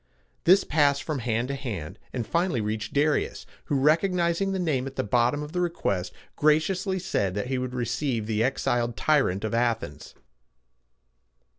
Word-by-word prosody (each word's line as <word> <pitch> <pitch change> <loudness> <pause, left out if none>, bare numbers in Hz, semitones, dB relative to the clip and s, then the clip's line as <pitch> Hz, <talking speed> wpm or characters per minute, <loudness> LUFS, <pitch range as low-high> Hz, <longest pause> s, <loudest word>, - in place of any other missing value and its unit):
This 185 +3 +6
passed 145 -2 +2
from 155 -4 -3
hand 120 +1 -1
to - - -1
hand, 105 - -5
and 120 -3 -3
finally 170 - 0
reached 105 0 -3
Darius, 145 +1 0 0.2
who, 145 - -1
recognizing 170 +5 +2
the 190 - -1
name 150 -8 0
at 135 - -8
the - - -1
bottom 120 +6 +1
of 150 - -8
the 180 - -1
request, 100 - -1 0.2
graciously 180 +6 +2
said 100 - -1
that 105 +5 -3
he 130 -1 0
would 125 0 -4
receive 120 -1 -1
the 110 0 -1
exiled 120 -2 0
tyrant 135 -11 +2
of 110 - -2
Athens. 115 -10 -2
130 Hz, 160 wpm, -26 LUFS, 115-155 Hz, 0.2 s, This